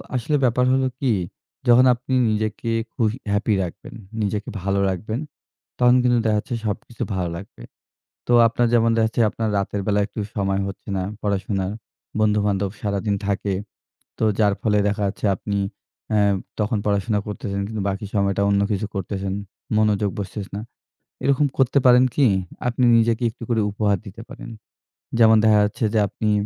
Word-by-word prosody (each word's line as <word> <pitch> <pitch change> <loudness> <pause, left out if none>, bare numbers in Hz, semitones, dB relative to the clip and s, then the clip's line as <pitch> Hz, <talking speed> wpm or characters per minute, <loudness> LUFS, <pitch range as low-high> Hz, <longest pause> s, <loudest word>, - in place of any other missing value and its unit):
আসলে 130 +5 0
ব্যাপার 125 0 +3
হল 135 - +2 0.2
কি 130 -4 +1 0.6
যখন 125 +2 +7
আপনি 125 +2 -5 0.2
নিজেকে 110 +2 -2 0.2
খু - - -1 0.3
হ্যাপি 105 +2 +1
রাখবেন, 85 - -8 0.3
নিজেকে 105 +1 -2
ভালো 100 +1 0
রাখবেন 110 +5 -3 0.6
তখন 125 0 +5
কিন্তু 120 -1 +3
দেখাচ্ছে 110 +2 0
সবকিছু 110 +3 -4
ভালো 90 -2 -1
লাগবে। 95 -9 -11 0.7
তো 120 - +2
আপনার 120 +1 +1
যেমন 115 -1 +4
দেখাচ্ছে 110 +1 +1
আপনার 110 0 -2
রাতের 100 0 -2
বেলা 105 0 +2
একটু 105 - -8 0.2
সময় 95 -1 0
হচ্ছে 100 - -9
না 95 - -1 0.2
পড়াশোনার। 95 -1 -1 0.5
বন্ধুবান্ধব 105 -2 +1
সারাদিন 100 0 -1
থাকে। 100 0 -1 0.6
তো - - -2 0.2
যার 105 -2 +4
ফলে 105 -1 +2
দেখা 105 +1 -1
যাচ্ছে 100 - -4
অ্যা 95 - 0 1.2
তখন 110 +1 0
পড়াশোনা 105 +1 +1
করতেছেন 100 -1 -4
কিন্তু 110 -2 -4
বাকি 100 +2 -4
সময়টা 100 -1 +1
অন্য 100 0 +3
কিছু 105 +1 -1
করতেছেন। 95 0 -3 0.4
মনোযোগ 105 -1 +2
বসতেছে 100 0 -6
না। 105 - -4 0.6
এরকম 140 +1 +3
করতে 135 +1 +2
পারেন 125 0 +7
কি? 145 - +4 0.4
আপনি 125 +1 0
নিজেকে 115 +1 +2
একটু 115 - -12
করে 115 -2 +2
উপহার 105 -1 +1
দিতে 100 +3 -10
পারেন। 135 -3 -9 0.7
যেমন 110 -1 +7
দেখা 110 -1 +5
যাচ্ছে 105 +2 -2
যে 110 - +4
আপনি 110 +1 -2
105 Hz, 155 wpm, -22 LUFS, 100-115 Hz, 1.2 s, যখন